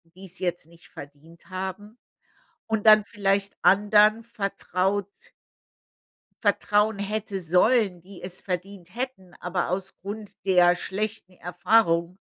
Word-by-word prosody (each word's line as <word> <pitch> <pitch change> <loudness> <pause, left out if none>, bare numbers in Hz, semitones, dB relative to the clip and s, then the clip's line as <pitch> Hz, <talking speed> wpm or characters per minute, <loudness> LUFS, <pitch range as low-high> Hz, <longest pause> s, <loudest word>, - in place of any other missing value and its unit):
die's 185 -1 -10
jetzt 175 -3 -3
nicht 170 0 -19
verdient 145 +6 -14
haben 190 +4 -6 0.7
und 220 -1 -2
dann 215 -1 +8
vielleicht 200 -2 -1
anderen 210 +3 +5
vertraut 200 -3 -2 1.3
vertrauen 210 0 +2
hätte 205 0 -3
sollen, 180 +2 +2
die 190 +2 -14
es 180 0 -5
verdient 185 0 -6
hätten, 235 -8 -6
aber 180 0 -2
aus 190 +1 -3
Grund 205 +1 -9
der 180 -2 +5
schlechten 195 0 -4
Erfahrung, 180 -1 +1
195 Hz, 110 wpm, -25 LUFS, 180-210 Hz, 1.3 s, dann